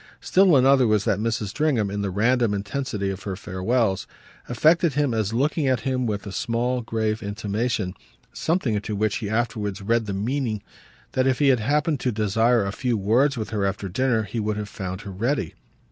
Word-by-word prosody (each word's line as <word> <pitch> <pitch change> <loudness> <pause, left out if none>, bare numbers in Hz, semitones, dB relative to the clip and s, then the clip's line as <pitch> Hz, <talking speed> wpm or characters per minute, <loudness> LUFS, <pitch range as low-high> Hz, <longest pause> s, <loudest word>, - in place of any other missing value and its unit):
Still 185 -5 +4
another 130 -1 +5
was 105 -2 +2
that - - +1
Mrs. 110 -2 -1
Stringham, 115 -4 0
in 100 0 -2
the 100 - -1
random 115 +2 +2
intensity 100 -1 -3
of 95 0 -7
her 95 -1 -4
farewells, 95 +2 -1 0.4
affected 155 +6 +3
him 145 -4 +1
as 110 -2 0
looking 140 +5 +1
at 130 -3 +1
him 130 -2 -1
with 105 -1 -3
a 100 - -6
small 120 +4 -1
grave 110 -1 -2
intimation, 105 -1 -2 0.4
something 160 -8 0
into 105 0 -2
which 105 0 0
he 105 -4 -4
afterwards 110 -3 -1
read 115 +1 +1
the 100 - -2
meaning 110 +1 -2 0.5
that 130 0 +1
if 130 -2 +2
he 145 -2 +3
had 130 -3 +4
happened 150 +5 +1
to 125 - 0
desire 110 +1 +2
a 100 - -2
few 120 +2 -1
words 120 +8 +2
with 110 -1 -4
her 105 -2 -1
after 100 0 -2
dinner 115 +3 +1
he 110 +3 -4
would 105 -1 -1
have 105 0 -4
found 95 -3 -5
her 100 - -8
ready. 110 - -1
110 Hz, 195 wpm, -24 LUFS, 100-130 Hz, 0.5 s, another